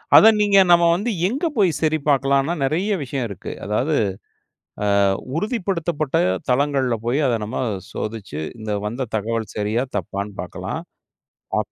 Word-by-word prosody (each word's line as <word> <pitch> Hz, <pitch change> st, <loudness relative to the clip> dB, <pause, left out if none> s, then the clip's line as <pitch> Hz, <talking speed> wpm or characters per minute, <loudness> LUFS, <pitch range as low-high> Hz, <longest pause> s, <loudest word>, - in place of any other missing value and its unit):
அத 220 Hz, -, +10 dB
நீங்க 205 Hz, -1 st, +4 dB
நம்ம 170 Hz, 0 st, +6 dB
வந்து 220 Hz, +6 st, -1 dB, 0.2 s
எங்க 275 Hz, -, -2 dB
போய் 195 Hz, -4 st, +5 dB
சரி 155 Hz, 0 st, +2 dB
பாக்கலாம்னா, 140 Hz, +3 st, +2 dB
நெறைய 175 Hz, +10 st, 0 dB
விஷயம் 130 Hz, -2 st, -3 dB
இருக்கு. 100 Hz, -, -7 dB
அதாவது 125 Hz, +9 st, 0 dB, 1.2 s
ஆ -, -, -4 dB, 0.2 s
உறுதிப்படுத்தப்பட்ட 175 Hz, -, -1 dB, 0.3 s
தளங்கள்ல 130 Hz, -2 st, +2 dB
போயி, 130 Hz, +5 st, +1 dB
அத 120 Hz, -2 st, +1 dB
நம்ம 130 Hz, +4 st, -3 dB, 0.3 s
சோதிச்சு 105 Hz, -8 st, -5 dB, 0.2 s
இந்த 110 Hz, -1 st, -4 dB
வந்த 120 Hz, +2 st, -3 dB
தகவல் 115 Hz, +1 st, -3 dB
சரியா, 110 Hz, +4 st, 0 dB
தப்பான்னு 100 Hz, +3 st, -4 dB
பாக்கலாம். 90 Hz, -, -5 dB, 0.8 s
அப் -, -, -4 dB
135 Hz, 135 wpm, -22 LUFS, 110-170 Hz, 1.2 s, அத